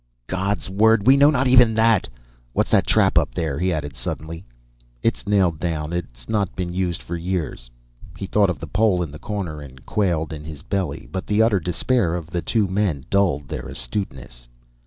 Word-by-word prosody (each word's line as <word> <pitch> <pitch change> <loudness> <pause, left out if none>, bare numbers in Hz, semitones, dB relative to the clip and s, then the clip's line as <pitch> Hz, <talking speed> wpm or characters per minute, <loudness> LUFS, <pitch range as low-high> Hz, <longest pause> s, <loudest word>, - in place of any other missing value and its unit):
"God's 95 +7 -2
word! 105 +2 +3
We 130 +2 +7
know 140 +1 +6
not 135 -3 +2
even 125 -3 +6
that. 115 0 +3 0.5
What's - - 0
that - - +3
trap - - +4
up - - -3
there?" 80 -5 -2
he 90 +1 +1
added 75 -4 -3
suddenly. 80 +3 -5 0.6
"It's - - 0
nailed 95 -6 +2
down. 80 -1 -2
It's 60 -9 -6
not 100 -4 -1
been 90 -1 -3
used 90 -2 -2
for 85 - -5
years." 85 -8 -3 0.5
He - - -4
thought 100 0 +3
of 90 - -2
the 80 - -6
pole 90 +2 +2
in 80 - -6
the 75 - -10
corner 95 -8 -4
and 65 -3 -13
quailed 85 -5 0
in 75 -1 -7
his 75 -1 -9
belly, 95 -1 -3
but 95 - -4
the 105 +1 +3
utter 110 -4 +3
despair 90 +2 0
of 85 -2 -6
the 85 - -1
two 105 +5 +1
men 95 -8 -1
dulled 90 -8 +2
their - - -5
astuteness. 60 - -5
90 Hz, 195 wpm, -22 LUFS, 75-105 Hz, 0.6 s, We